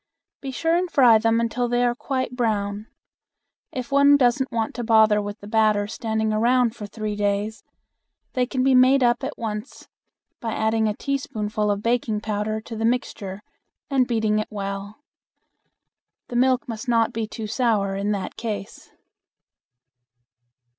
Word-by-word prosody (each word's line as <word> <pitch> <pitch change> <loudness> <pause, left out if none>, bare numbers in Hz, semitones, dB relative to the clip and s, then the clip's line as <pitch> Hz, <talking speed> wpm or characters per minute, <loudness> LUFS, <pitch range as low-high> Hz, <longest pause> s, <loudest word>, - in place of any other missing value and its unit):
Be 275 - -5
sure 325 +5 0
and 360 +1 0
fry 245 -8 +6
them 225 +1 +2
until 235 +1 -1
they 245 +1 +1
are 240 - +2
quite 255 0 -3
brown. 210 -3 -1 0.8
If 255 +1 -6
one 280 +1 +6
doesn't 260 +1 +2
want 225 -2 -1
to 240 - -4
bother 220 -2 +4
with 205 +1 -6
the 205 - -10
batter 215 -1 +2
standing 220 0 -2
around 235 +1 +2
for 210 - -7
three 215 0 -4
days, 205 +1 -1 0.7
they 250 -1 +1
can 255 0 -1
be 265 0 +4
made 255 +1 +5
up 240 +1 +2
at 275 +3 -4
once 215 +1 -6 0.5
by 225 -2 -3
adding 220 0 +1
a 210 - -1
teaspoonful 215 -7 -2
of 205 0 -1
baking 230 -3 0
powder 215 0 -2
to 225 +1 -8
the 225 - -3
mixture 210 -4 -2 0.5
and 260 -2 +3
beating 220 -3 +1
it 215 - -3
well. 200 +4 -6 1.3
The 245 - -6
milk 255 0 +2
must 230 +2 -6
not 230 -2 +2
be 225 -1 -2
too 220 0 -6
sour 210 -3 0
in 200 +1 -1
that 200 -2 -3
case. 210 -4 -6
225 Hz, 160 wpm, -23 LUFS, 210-245 Hz, 1.3 s, fry